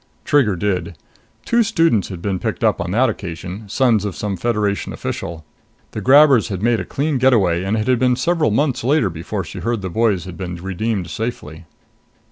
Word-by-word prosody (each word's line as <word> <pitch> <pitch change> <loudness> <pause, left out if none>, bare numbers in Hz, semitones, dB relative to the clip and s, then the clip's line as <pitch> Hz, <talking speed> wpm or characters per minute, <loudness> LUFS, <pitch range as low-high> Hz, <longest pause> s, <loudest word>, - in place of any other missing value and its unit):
Trigger 130 -9 +3
did. 90 -3 -2 0.5
Two 235 0 +3
students 165 - +2
had 90 -4 -8
been 95 -3 -1
picked - - -3
up - - +2
on 85 - -3
that 120 +8 +3
occasion 100 0 -6
sons 115 -3 +2
of 100 -3 -4
some 105 -2 -3
Federation 105 0 -1
official. 80 -2 -5 0.5
The - - -5
grabbers 140 -2 +6
had 95 -3 -5
made 120 -1 +2
a 95 - -4
clean 140 - -1
getaway, 100 -10 +3
and 100 +3 -1
it 110 +2 -2
had 125 -2 +3
been 125 -1 +3
several 160 +3 +1
months 130 +3 0
later 135 - +2
before 90 +5 -4
she 80 - -8
heard 115 -3 -2
the 95 - -4
boys 105 -4 +1
had 90 -2 -9
been 90 -2 -5
redeemed 95 +2 -3
safely. 85 -9 -5
105 Hz, 190 wpm, -19 LUFS, 90-125 Hz, 0.5 s, grabbers